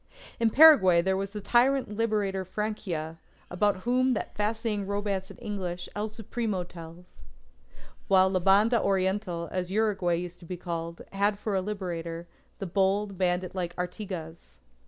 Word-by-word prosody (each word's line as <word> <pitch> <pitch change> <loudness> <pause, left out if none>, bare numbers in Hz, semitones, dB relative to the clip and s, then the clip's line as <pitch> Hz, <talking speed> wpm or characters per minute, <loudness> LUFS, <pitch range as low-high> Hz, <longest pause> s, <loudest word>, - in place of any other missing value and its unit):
In 230 -1 +3
Paraguay 215 - +7
there 190 +1 +1
was 195 +1 -3
the 210 0 -6
tyrant 245 0 +2
liberator 205 -4 0
Francia, 185 -5 -4 0.3
about 195 +1 +1
whom 255 +2 +2
that - - -4
fascinating 210 -1 -1
romance 200 -2 -2
in - - -12
English, 190 -7 -4
El 210 +1 -2
Supremo, 215 -3 -3
tells. 170 - -13 0.9
While 190 -1 +5
La 185 - +1
Banda 205 +6 +4
Oriental, 190 -3 0
as 180 -1 -2
Uruguay 195 -5 +1
used 175 +1 -6
to - - -13
be 180 +1 -5
called, 170 -1 -5
had 200 +1 +1
for 210 0 -3
a 190 - +1
Liberator, 170 -4 -4 0.3
the 195 - -5
bold 195 +2 +1
bandit 180 0 0
like 175 -2 -3
Artigas. 180 - -6
195 Hz, 150 wpm, -28 LUFS, 180-210 Hz, 0.9 s, Paraguay